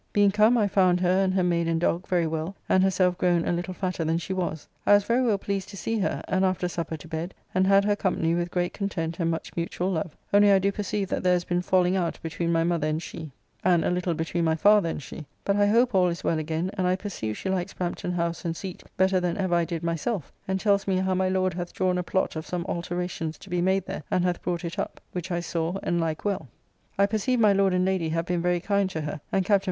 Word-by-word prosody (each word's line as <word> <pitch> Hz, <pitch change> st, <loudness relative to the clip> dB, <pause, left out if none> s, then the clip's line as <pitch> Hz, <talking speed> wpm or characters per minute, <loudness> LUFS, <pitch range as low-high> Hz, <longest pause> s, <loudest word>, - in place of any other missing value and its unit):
Being 205 Hz, -1 st, +4 dB
come, 215 Hz, +4 st, +4 dB
I 210 Hz, -3 st, +3 dB
found 185 Hz, -2 st, +3 dB
her 185 Hz, +2 st, +3 dB
and 190 Hz, -, +1 dB
her 185 Hz, -, +2 dB
maid 170 Hz, -1 st, +1 dB
and 165 Hz, 0 st, +1 dB
dogg 175 Hz, +1 st, 0 dB
very 175 Hz, -2 st, +2 dB
well, 160 Hz, +4 st, -3 dB
and 185 Hz, -, +4 dB
herself 185 Hz, -1 st, +2 dB
grown 175 Hz, -2 st, +2 dB
a -, -, +2 dB
little 175 Hz, +2 st, -2 dB
fatter 185 Hz, -3 st, -2 dB
than 160 Hz, +1 st, +1 dB
she 175 Hz, +3 st, -4 dB
was. 175 Hz, -4 st, -3 dB, 0.2 s
I -, -, +5 dB
was 205 Hz, -, +3 dB
very 235 Hz, +5 st, +2 dB
well 230 Hz, -5 st, +2 dB
pleased 195 Hz, -1 st, -3 dB
to 200 Hz, -, -9 dB
see 225 Hz, +3 st, -2 dB
her, 195 Hz, -, -1 dB
and 190 Hz, 0 st, +1 dB
after 185 Hz, -1 st, +1 dB
supper 165 Hz, -2 st, -4 dB
to 155 Hz, -, -12 dB
bed, 165 Hz, +3 st, -4 dB, 0.2 s
and 185 Hz, +1 st, +3 dB
had 195 Hz, 0 st, +5 dB
her 205 Hz, 0 st, +2 dB
company 175 Hz, -4 st, 0 dB
with 175 Hz, 0 st, -1 dB
great 175 Hz, 0 st, -1 dB
content 170 Hz, -5 st, -3 dB
and 165 Hz, -1 st, +1 dB
much 165 Hz, 0 st, -4 dB
mutual 175 Hz, +2 st, -2 dB
love, 160 Hz, -2 st, -3 dB, 0.2 s
only 205 Hz, 0 st, +6 dB
I 195 Hz, -, +6 dB
do 195 Hz, +1 st, +1 dB
perceive 200 Hz, -1 st, -2 dB
that -, -, -1 dB
there 180 Hz, 0 st, +3 dB
has 175 Hz, -1 st, +1 dB
been 175 Hz, 0 st, 0 dB
falling 180 Hz, 0 st, +2 dB
out 175 Hz, -3 st, -1 dB
between 165 Hz, +1 st, -2 dB
my 165 Hz, -1 st, +2 dB
mother 170 Hz, -3 st, 0 dB
and 155 Hz, 0 st, 0 dB
she, 160 Hz, -1 st, -7 dB, 0.3 s
and 175 Hz, -3 st, +3 dB
a -, -, +1 dB
little 180 Hz, -1 st, 0 dB
between 165 Hz, +2 st, -1 dB
my 160 Hz, -1 st, +2 dB
father 205 Hz, +1 st, +4 dB
and 150 Hz, -, -4 dB
she; 155 Hz, +2 st, -9 dB, 0.2 s
but 200 Hz, -, +2 dB
I 205 Hz, 0 st, +4 dB
hope 235 Hz, +3 st, +3 dB
all 185 Hz, -2 st, +4 dB
is 170 Hz, -1 st, -3 dB
well 160 Hz, -, +1 dB
again, 160 Hz, +4 st, -2 dB
and 185 Hz, -3 st, 0 dB
I 180 Hz, -, +3 dB
perceive 180 Hz, -, -5 dB
she 190 Hz, -, -4 dB
likes 190 Hz, 0 st, -2 dB
Brampton 180 Hz, 0 st, -3 dB
House 170 Hz, -1 st, -2 dB
and 165 Hz, -2 st, -2 dB
seat 190 Hz, -2 st, -7 dB, 0.2 s
better 190 Hz, 0 st, +3 dB
than 180 Hz, -1 st, -1 dB
ever 185 Hz, -3 st, 0 dB
I 170 Hz, -1 st, +3 dB
did 170 Hz, -1 st, -4 dB
myself, 170 Hz, -, -2 dB, 0.2 s
and 190 Hz, 0 st, 0 dB
tells 200 Hz, -1 st, +2 dB
me 190 Hz, -, +2 dB
how 190 Hz, 0 st, +1 dB
my 185 Hz, 0 st, +1 dB
Lord 185 Hz, -1 st, +1 dB
hath 175 Hz, 0 st, -5 dB
drawn 185 Hz, -1 st, +1 dB
a -, -, -1 dB
plot 190 Hz, 0 st, -1 dB
of 160 Hz, -, -5 dB
some 175 Hz, -1 st, -3 dB
alteracions 175 Hz, -2 st, -3 dB
to 195 Hz, -, -14 dB
be 180 Hz, -1 st, +1 dB
made 190 Hz, +1 st, +1 dB
there, -, -, -5 dB
and 180 Hz, -, +1 dB
hath 180 Hz, -1 st, -1 dB
brought 175 Hz, 0 st, -2 dB
it 170 Hz, -, -5 dB
up, -, -, -4 dB
which 180 Hz, 0 st, -5 dB
I 175 Hz, -1 st, -1 dB
saw 170 Hz, +1 st, -2 dB
and 170 Hz, -1 st, 0 dB
like 160 Hz, +1 st, -3 dB
well. 200 Hz, -8 st, -1 dB, 0.5 s
I 200 Hz, -, +5 dB
perceive 220 Hz, +5 st, 0 dB
my 210 Hz, -3 st, +5 dB
Lord 195 Hz, -1 st, +3 dB
and 180 Hz, 0 st, +2 dB
Lady 185 Hz, -4 st, 0 dB
have 165 Hz, +1 st, -1 dB
been 175 Hz, -1 st, -1 dB
very 175 Hz, 0 st, +1 dB
kind 200 Hz, +1 st, +1 dB
to 160 Hz, -4 st, -4 dB
her, 150 Hz, -1 st, -5 dB
and 190 Hz, -1 st, +1 dB
Captn. 200 Hz, 0 st, +4 dB
180 Hz, 265 wpm, -26 LUFS, 170-195 Hz, 0.5 s, only